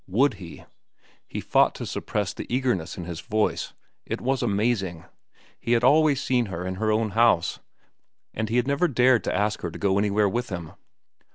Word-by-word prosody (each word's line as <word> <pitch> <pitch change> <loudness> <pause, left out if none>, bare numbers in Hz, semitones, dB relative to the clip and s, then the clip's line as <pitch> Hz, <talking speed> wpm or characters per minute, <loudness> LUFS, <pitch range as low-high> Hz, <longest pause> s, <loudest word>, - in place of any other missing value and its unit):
Would 125 +9 +2
he! 85 -2 -10 0.6
He - - -5
fought - - +3
to - - -5
suppress 105 -2 -3
the - - -8
eagerness 125 -10 -1
in 90 - -5
his 85 -1 -6
voice. 110 0 -1 0.3
It - - -4
was 135 +1 -1
amazing. 100 -6 -1 0.5
He 120 - 0
had 120 0 +2
always 145 +1 +4
seen 125 -3 +1
her 90 -2 -5
in 95 0 -4
her 110 -1 +2
own 110 0 +1
house. 115 -6 +2 0.7
And 110 -1 -3
he 115 - -1
had 125 0 +3
never 140 +5 +2
dared 125 -4 +3
to - - -1
ask 105 +1 0
her 85 - -3
to - - -9
go 100 -1 +1
anywhere 105 0 +2
with 120 +5 -2
him. 85 -5 -6
110 Hz, 190 wpm, -25 LUFS, 95-125 Hz, 0.7 s, always